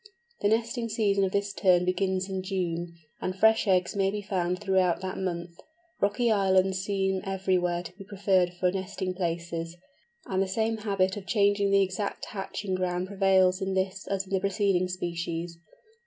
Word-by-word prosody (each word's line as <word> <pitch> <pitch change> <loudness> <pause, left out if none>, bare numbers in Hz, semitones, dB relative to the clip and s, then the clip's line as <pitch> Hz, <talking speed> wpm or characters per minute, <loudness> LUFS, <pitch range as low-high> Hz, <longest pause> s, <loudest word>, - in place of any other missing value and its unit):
The 205 - +3
nesting 230 +2 0
season 205 -3 +2
of 185 - -2
this 200 0 -1
Tern 180 -3 +3
begins 185 0 0
in 190 -1 -3
June, 175 -2 -2 0.3
and 185 - -2
fresh 220 +2 +4
eggs 185 -1 +2
may 195 -1 +2
be 205 +1 -4
found 180 -3 -1
throughout 190 -3 +2
that 190 0 -4
month. 170 -2 -3 0.5
Rocky 225 +4 +2
islands 190 -2 +3
seem 190 -1 0
everywhere 185 -2 0
to 180 - -9
be 195 - -10
preferred 190 -2 +1
for 180 0 +1
nesting 190 0 -3
places, 170 -1 -3 0.5
and 190 0 0
the 195 - +1
same 220 +3 0
habit 195 -3 0
of 195 - -8
changing 205 -2 +3
the 195 0 +5
exact 190 +2 -3
hatching 195 0 -4
ground 180 0 -1
prevails 190 -1 +3
in 190 0 -1
this 190 0 -2
as 195 -1 -1
in 195 - -8
the 190 - +3
preceding 195 -2 +1
species. 170 -1 -4
190 Hz, 170 wpm, -28 LUFS, 180-200 Hz, 0.5 s, the